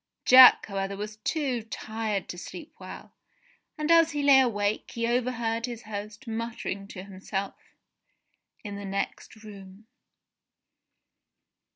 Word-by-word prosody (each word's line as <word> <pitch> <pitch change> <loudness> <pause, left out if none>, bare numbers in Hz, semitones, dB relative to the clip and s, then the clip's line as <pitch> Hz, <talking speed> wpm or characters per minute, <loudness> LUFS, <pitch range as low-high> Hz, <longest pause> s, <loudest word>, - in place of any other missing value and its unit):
Jack, 255 0 +9
however, 195 -1 -4
was 210 +1 -6
too 255 +1 -2
tired 220 -3 -4
to 175 - -6
sleep 315 - -10
well, - - -10 0.6
and 305 +2 -1
as 330 -1 +5
he 290 -1 -2
lay 280 -1 +7
awake, 210 -4 0
he 230 0 -1
overheard 235 -1 -1
his 235 -1 -7
host 210 +1 -8
muttering 225 -3 -4
to 185 -2 -9
himself 195 0 -7 0.9
in 205 -2 -6
the 200 - -7
next 195 +2 -5
room. 200 -1 -12
220 Hz, 125 wpm, -27 LUFS, 200-245 Hz, 0.9 s, Jack